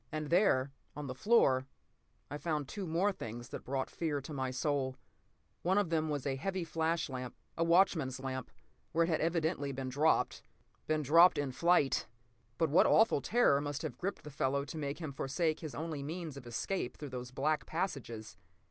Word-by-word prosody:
And 155 Hz, -1 st, -4 dB
there, 145 Hz, -8 st, +4 dB, 0.2 s
on 150 Hz, 0 st, -5 dB
the 130 Hz, -, -4 dB
floor, 130 Hz, -, +3 dB, 0.6 s
I 145 Hz, -, -4 dB
found 150 Hz, -2 st, -1 dB
two 195 Hz, +4 st, -5 dB
more 175 Hz, +6 st, +2 dB
things 120 Hz, -, -7 dB
that -, -, -7 dB
brought 135 Hz, 0 st, -2 dB
fear 155 Hz, -4 st, -1 dB
to 140 Hz, +3 st, -8 dB
my 130 Hz, -2 st, -1 dB
soul. 130 Hz, 0 st, -1 dB, 0.6 s
One 185 Hz, +3 st, +2 dB
of 200 Hz, -5 st, +1 dB
them 160 Hz, -1 st, +1 dB
was 145 Hz, -3 st, -2 dB
a 135 Hz, -1 st, -1 dB
heavy 185 Hz, +5 st, -2 dB
flash 165 Hz, 0 st, 0 dB
lamp—a 130 Hz, +5 st, -5 dB
watchman's 165 Hz, -7 st, +3 dB
lamp—where 135 Hz, +5 st, -4 dB
it 165 Hz, -, 0 dB
had 160 Hz, -, +1 dB
evidently 160 Hz, -3 st, 0 dB
been 135 Hz, -1 st, -4 dB
dropped. 150 Hz, +5 st, +2 dB, 0.5 s
Been 155 Hz, -1 st, +1 dB
dropped 165 Hz, +6 st, +7 dB
in 145 Hz, -2 st, -1 dB
flight! 170 Hz, 0 st, +3 dB, 0.5 s
But 160 Hz, -3 st, +1 dB
what 160 Hz, -, +6 dB
awful 225 Hz, -10 st, +5 dB
terror 145 Hz, -, +3 dB
must 145 Hz, +1 st, -4 dB
have 135 Hz, -6 st, -5 dB
gripped 195 Hz, +2 st, -3 dB
the 150 Hz, -, -8 dB
fellow 140 Hz, 0 st, 0 dB
to 155 Hz, -, -8 dB
make 145 Hz, -1 st, -3 dB
him 155 Hz, -5 st, -5 dB
forsake 155 Hz, +4 st, 0 dB
his 155 Hz, -4 st, -6 dB
only 160 Hz, -2 st, -4 dB
means 160 Hz, +1 st, -5 dB
of 130 Hz, -3 st, -10 dB
escape 125 Hz, +5 st, -3 dB
through 145 Hz, -, -6 dB
those 125 Hz, -1 st, -6 dB
black 145 Hz, +4 st, 0 dB
passages? 120 Hz, -, -4 dB
150 Hz, 185 wpm, -33 LUFS, 135-165 Hz, 0.6 s, dropped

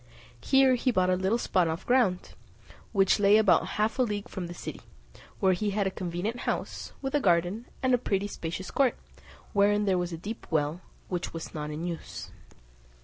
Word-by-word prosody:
Here 270 Hz, -, +5 dB
he 255 Hz, +1 st, +1 dB
bought 185 Hz, -6 st, +2 dB
a -, -, +3 dB
little 190 Hz, +5 st, +1 dB
spot 185 Hz, -7 st, +1 dB
of 160 Hz, +3 st, -3 dB
ground, 240 Hz, -8 st, +2 dB, 0.6 s
which 195 Hz, -1 st, +3 dB
lay 205 Hz, +1 st, +6 dB
about 215 Hz, -4 st, +4 dB
half 215 Hz, +5 st, 0 dB
a -, -, +5 dB
league 210 Hz, -4 st, -1 dB
from 180 Hz, -2 st, -5 dB
the 175 Hz, -, -7 dB
city; -, -, -7 dB, 0.6 s
where 190 Hz, -2 st, +4 dB
he 205 Hz, +4 st, -1 dB
had 200 Hz, 0 st, 0 dB
a 190 Hz, -, 0 dB
convenient 185 Hz, +7 st, -3 dB
house, -, -, -3 dB
with 270 Hz, -, -2 dB
a 290 Hz, -, +3 dB
garden, 180 Hz, +2 st, +1 dB, 0.2 s
and 260 Hz, 0 st, +3 dB
a 245 Hz, -, +4 dB
pretty 200 Hz, -4 st, 0 dB
spacious 175 Hz, -2 st, -5 dB
court, 270 Hz, -3 st, +2 dB, 0.6 s
wherein 205 Hz, 0 st, +3 dB
there 190 Hz, -2 st, +2 dB
was 175 Hz, 0 st, -2 dB
a 165 Hz, -, -4 dB
deep 210 Hz, +7 st, -7 dB
well, 155 Hz, +2 st, 0 dB, 0.3 s
which 180 Hz, -2 st, -4 dB
was 165 Hz, -, -6 dB
not 150 Hz, -1 st, -4 dB
in 155 Hz, +3 st, -4 dB
use. 170 Hz, -2 st, -6 dB
195 Hz, 195 wpm, -28 LUFS, 175-220 Hz, 0.6 s, lay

